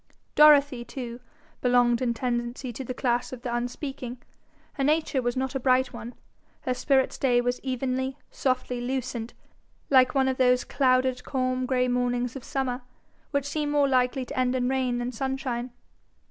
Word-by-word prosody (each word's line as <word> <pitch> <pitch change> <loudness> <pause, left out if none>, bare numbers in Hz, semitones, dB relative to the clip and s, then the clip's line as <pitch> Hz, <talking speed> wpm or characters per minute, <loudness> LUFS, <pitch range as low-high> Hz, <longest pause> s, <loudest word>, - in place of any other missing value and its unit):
Dorothy, 285 -4 +6
too, 240 -1 -7 0.4
belonged 245 -1 +3
in 240 -2 0
tendency 240 +1 -3
to 265 - -5
the 255 - -5
class 245 -1 0
of 250 -2 -8
the 240 - -3
unspeaking. 250 +1 -4 0.6
Her 275 - -2
nature 300 -1 +2
was 245 +1 -1
not 265 0 -1
a 270 - -1
bright 255 0 +2
one. 240 +2 -8 0.5
Her 255 - -1
spirit's 265 +1 +1
day 245 -3 +3
was 245 +1 0
evenly, 260 +1 -2
softly 255 -2 -1
lucent, 245 -2 -3 0.6
like 260 0 +5
one 265 -1 +3
of 260 -1 0
those 250 -1 +4
clouded 255 -1 +2
calm 255 -1 -1
grey 255 -1 +2
mornings 245 0 0
of 265 - -7
summer, 265 -2 -2 0.5
which 280 -2 -1
seem 295 +1 -2
more 290 -1 +3
likely 255 0 +1
to - - -8
end 255 0 +2
in 250 -1 0
rain 260 -2 0
than 245 +1 -2
sunshine. 260 -1 -3
255 Hz, 165 wpm, -26 LUFS, 245-265 Hz, 0.6 s, Dorothy